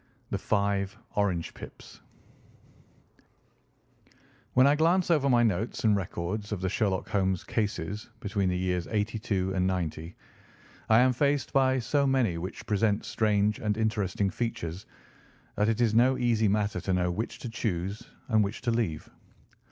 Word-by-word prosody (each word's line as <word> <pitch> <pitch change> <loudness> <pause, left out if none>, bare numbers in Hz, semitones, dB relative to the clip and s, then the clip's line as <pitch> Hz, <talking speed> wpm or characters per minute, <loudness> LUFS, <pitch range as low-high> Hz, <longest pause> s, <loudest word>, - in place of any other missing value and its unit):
V. - - -36 0.2
THE - - -1
FIVE 100 -1 0 0.2
ORANGE 95 -5 0
PIPS - - -12 2.5
When 130 - +6
I 140 - +5
glance 170 +3 +2
over 145 -4 +3
my 120 -2 +4
notes 110 +4 -1
and 110 -2 +4
records 100 +2 -4
of 105 - -2
the 95 0 -1
Sherlock 100 -2 0
Holmes 95 -3 0
cases 105 -1 -3
between 100 -2 -1
the 90 - 0
years 90 -1 -1
'82 105 -3 -1
and 95 -1 +1
'90, 85 -2 -3 0.7
I 110 +1 +6
am 130 0 +4
faced 140 +2 0
by 130 -1 +3
so 140 +3 +1
many 120 -11 +1
which 90 +4 -6
present 105 0 +1
strange 105 -1 +1
and 105 -1 -1
interesting 105 -3 0
features 95 -5 -4 0.7
that 105 +2 +2
it 115 0 0
is 115 -3 +2
no 125 +3 +4
easy 115 -3 +2
matter 100 -2 0
to 95 +1 -1
know 90 -1 +1
which 115 +5 -4
to 120 - -7
choose 100 -3 -3 0.2
and 110 -3 +3
which 100 +4 -4
to 120 - 0
leave. 110 -10 -1
105 Hz, 155 wpm, -28 LUFS, 95-115 Hz, 2.5 s, When